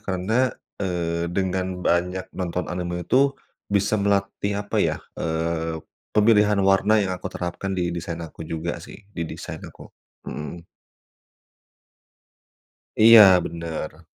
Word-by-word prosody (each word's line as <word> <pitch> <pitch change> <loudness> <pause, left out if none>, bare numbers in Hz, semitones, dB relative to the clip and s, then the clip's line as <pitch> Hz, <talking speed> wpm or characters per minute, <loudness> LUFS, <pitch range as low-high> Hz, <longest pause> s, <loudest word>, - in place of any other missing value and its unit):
karena, 105 +7 0 0.3
eee, 85 -3 -1
dengan 95 0 -2
banyak 90 +2 0
nonton 90 -1 -3
anime 90 0 -3
itu 135 +7 +3 0.3
bisa 100 +1 +1
melatih 100 0 0
apa, 100 - -4
ya, - - +1 0.2
eee, 80 0 -1 0.4
pemilihan 105 -1 +5
warna 95 +3 +4
yang 95 - -2
aku 90 - -5
terapkan 90 +2 -4
di 90 -1 -1
desain 85 0 -4
aku 80 - -13
juga 85 +1 -3
sih, - - -11 0.2
di 85 - -4
desain - - -7
aku. - - -14 0.4
Mhm. 85 +3 -7 2.3
Iya, 110 -5 +9
bener. 80 -1 -6
90 Hz, 120 wpm, -24 LUFS, 85-100 Hz, 2.3 s, Iya